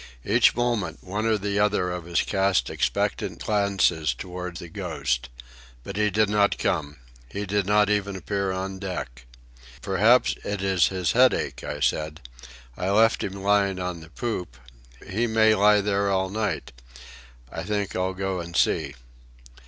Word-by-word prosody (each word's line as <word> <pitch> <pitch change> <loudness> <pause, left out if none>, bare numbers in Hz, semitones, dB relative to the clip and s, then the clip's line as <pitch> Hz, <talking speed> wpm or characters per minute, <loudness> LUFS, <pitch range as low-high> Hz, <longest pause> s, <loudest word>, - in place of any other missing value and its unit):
Each - - +4
moment 115 -9 -1
one 105 +4 -2
or 110 -1 +3
the 100 0 -2
other 105 -3 +1
of 90 -1 -6
us 85 - +1
cast 95 -1 +1
expectant - - -1
glances 95 - +1
toward 90 +3 -6
the 85 - -8
Ghost. 70 -10 -3 0.5
But 100 - -7
he 105 0 +2
did 105 +2 +2
not 105 0 +2
come. 75 -4 -1 0.3
He 100 +8 -4
did 100 0 0
not 105 0 +4
even 100 -1 0
appear 100 0 -2
on 95 +1 -4
deck. 65 -11 -6 0.6
"Perhaps 105 +6 +3
it 100 -1 -3
is 95 -3 +3
his 90 -3 -1
headache," 125 +1 +2
I - - -5
said. 75 0 -1 0.5
"I 90 - -2
left 110 +3 +3
him 100 0 -5
lying 100 -1 +2
on 90 -2 -4
the 80 0 -13
poop. 90 - -4 0.5
He 115 +5 0
may 110 -1 +4
lie 105 0 +5
there 100 0 0
all 95 -1 0
night. 105 -5 -2 0.8
I 80 - -5
think 100 0 -2
I'll 95 0 -1
go 95 -1 -2
and 85 0 -7
see." - - +1
95 Hz, 160 wpm, -25 LUFS, 90-105 Hz, 0.8 s, lie